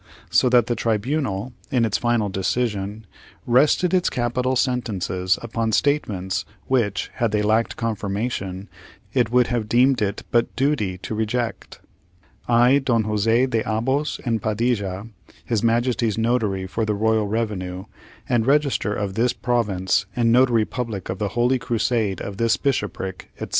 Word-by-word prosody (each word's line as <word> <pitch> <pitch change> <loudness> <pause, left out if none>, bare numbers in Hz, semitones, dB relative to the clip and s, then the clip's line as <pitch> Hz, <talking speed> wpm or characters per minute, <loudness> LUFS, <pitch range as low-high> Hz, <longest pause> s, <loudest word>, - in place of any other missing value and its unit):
So 125 - +4
that 120 -2 +5
the 120 - -1
tribunal, 115 0 -1 0.2
in 125 -5 +2
its 110 - 0
final 120 -3 +1
decision, 105 +1 -2 0.4
rested 150 +9 +3
its 180 -1 +3
capital 125 +1 -1
sentences 100 -8 0
upon 115 -1 -2
statements 105 -11 0 0.2
which, 115 -7 0
had 115 -3 +1
they 105 0 +1
lacked 110 +2 +1
confirmation, 100 -3 -3 0.5
it 125 -4 +2
would 125 0 +4
have 110 -3 -2
deemed 125 +2 +3
it 100 0 -1
but 120 0 +1
duty 130 -10 0
to 95 +4 -6
reject. 110 +2 -3 0.7
I, 120 +3 +5
DON 120 -5 +1
JOSE 105 0 -1 0.2
DE 115 -3 0
ABOS 130 +7 -1
AND 115 -3 0
PADILLA, 105 -3 -1 0.4
His 115 -3 0
Majesty's 115 -1 +1
Notary 110 -5 0
for 105 +4 -2
the 105 -1 0
Royal 110 0 +1
Revenue, 100 -4 -3 0.4
and 120 -2 +1
Register 140 -7 +2
of 100 -2 -3
this 115 +4 +1
Province, 100 -6 0
and 115 -1 +2
Notary 120 -3 +4
Public 115 -7 -5
of 95 - -4
the 105 - 0
Holy 125 +2 +3
Crusade 115 -4 0
of 100 -1 -6
this 115 0 +2
Bishopric, 105 -8 -3
etc. - - -6
115 Hz, 150 wpm, -22 LUFS, 105-125 Hz, 0.7 s, that